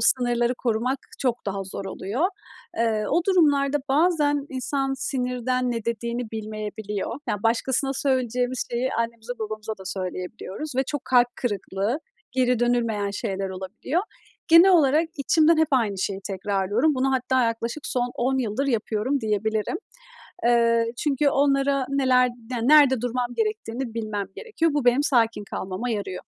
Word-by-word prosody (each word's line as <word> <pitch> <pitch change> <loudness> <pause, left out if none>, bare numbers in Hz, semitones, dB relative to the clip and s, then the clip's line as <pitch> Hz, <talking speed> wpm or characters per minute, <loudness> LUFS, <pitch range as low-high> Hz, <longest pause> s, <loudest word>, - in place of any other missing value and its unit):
sınırları 240 0 +2
korumak 245 +2 -1 0.2
çok 245 -5 -1
daha 195 0 -2
zor 195 +1 -6
oluyor. 215 - -1 0.5
Iıı, 220 -2 +1
o - - +3
durumlarda 295 -7 +3
bazen 290 -1 +2
insan 270 +1 -2
sinirden 255 -1 -1
ne 230 -2 -3
dediğini 235 0 -3
bilmeyebiliyor. 215 0 -4
Yani, 205 0 -2
başkasına 260 +4 +1
söyleyeceğimiz 250 -2 0
şeyi 245 +2 -1
annemize 230 0 -3
babamıza 215 0 -4
da 190 - -11
söyleyebiliyoruz 190 +8 -5
ve 265 - +3
çok 290 -3 -4
kalp 245 -1 +4
kırıklığı, 205 - -2 0.3
geri 250 -2 +2
dönülmeyen 230 -4 +1
şeyler 195 -2 -3
olabiliyor. 190 - -3 0.5
Genel 335 +4 +8
olarak 315 0 +4
içimden 315 +3 +4
hep 320 -1 +3
aynı 225 -8 +1
şeyi 195 +1 -2
tekrarlıyorum. 205 - 0
Bunu 265 +1 +1
hatta 260 -1 +2
yaklaşık 230 +5 -3
son 245 -1 -1
10 265 +2 0
yıldır 250 +3 -1
yapıyorum 230 +2 0
diyebilirim. 215 -1 -1 0.7
Iıı, 230 -1 +4
çünkü 285 +1 +2
onlara 275 -1 +2
neler 255 -2 +3
den 235 0 -4
nerede 280 -5 +6
durmam 245 0 -1
gerektiğini 265 - -2
bilmem 215 -3 -3
gerekiyor. 330 -8 -1
Bu 290 -3 0
benim 245 +4 +4
sakin 230 -7 +2
kalmama 195 +4 -4
yarıyor. 205 -5 -3
245 Hz, 140 wpm, -24 LUFS, 220-275 Hz, 0.7 s, Genel